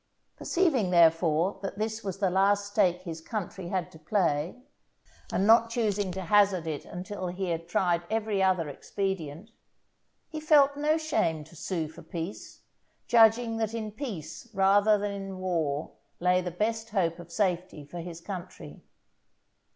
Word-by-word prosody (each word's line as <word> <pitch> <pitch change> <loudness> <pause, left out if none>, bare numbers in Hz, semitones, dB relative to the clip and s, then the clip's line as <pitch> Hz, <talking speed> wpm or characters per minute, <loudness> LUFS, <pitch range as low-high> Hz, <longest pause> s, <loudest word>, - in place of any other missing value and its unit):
Perceiving, 295 - +1
therefore, 165 +1 +3
that 195 0 -5
this 220 +1 -3
was 195 -2 -4
the 195 -2 +1
last 200 +2 +3
stake 185 -3 +2
his 165 -3 -6
country 190 -2 -5
had 180 -1 -2
to 160 - -14
play, 165 -2 0 0.8
and 190 - +1
not 230 +1 +6
choosing 210 -5 0
to 190 - -4
hazard 195 -1 +3
it 155 -3 -4
until 185 +1 -6
he 180 +1 -3
had 165 0 -3
tried 175 -1 +1
every 215 -2 0
other 185 -4 +2
expedient, 190 +3 -4 0.8
he 315 - -6
felt 290 -2 +5
no 300 +2 +2
shame 170 - 0
to 160 +3 -17
sue 165 0 -3
for 160 - -12
peace, 165 +4 -7 0.5
judging 225 0 +5
that 225 0 -2
in 215 -2 -4
peace 205 - -7
rather 200 +2 +5
than 205 0 -2
in 195 -1 -6
war 165 -5 -1 0.3
lay 180 +1 +3
the 180 - -3
best 225 +5 -2
hope 175 -6 0
of 170 0 -11
safety 180 -5 -1
for 175 +4 -8
his 170 0 -7
country. 175 - -8
190 Hz, 155 wpm, -28 LUFS, 170-215 Hz, 0.8 s, not